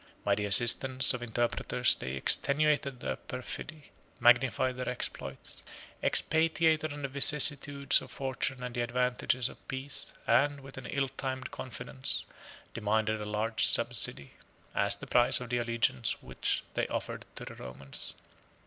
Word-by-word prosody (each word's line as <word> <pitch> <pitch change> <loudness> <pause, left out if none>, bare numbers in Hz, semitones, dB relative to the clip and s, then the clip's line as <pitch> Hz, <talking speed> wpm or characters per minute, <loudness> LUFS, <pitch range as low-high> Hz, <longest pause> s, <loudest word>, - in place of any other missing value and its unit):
By 100 - +1
the 105 +1 -2
assistance 130 +6 +4
of 125 - -5
interpreters 120 0 0
they 65 - -6
extenuated 140 - +1
their - - -4
perfidy, 140 +4 -8 0.3
magnified 120 +1 +3
their 125 - -4
exploits, 125 - -5 0.4
expatiated 160 -1 +1
on 145 0 -8
the - - -1
vicissitudes 140 0 +6
of 130 - -11
fortune 135 -1 -3
and 125 -1 -6
the 120 - -2
advantages 125 +1 0
of - - -14
peace, 135 +1 -4
and, 140 +4 +1
with 135 -1 -11
an 125 - -10
ill 135 -1 -2
timed 130 -1 -6
confidence, 65 - -3 0.5
demanded 110 0 -1
a - - -5
large 110 +2 -2
subsidy, 70 -1 +2 0.4
as - - 0
the - - -11
price 120 +1 +4
of 125 -1 -8
the 120 - 0
alliance 115 - -1
which - - -3
they - - -2
offered - - -5
to - - -7
the - - -9
Romans. 70 +2 -8
125 Hz, 145 wpm, -29 LUFS, 115-140 Hz, 0.5 s, vicissitudes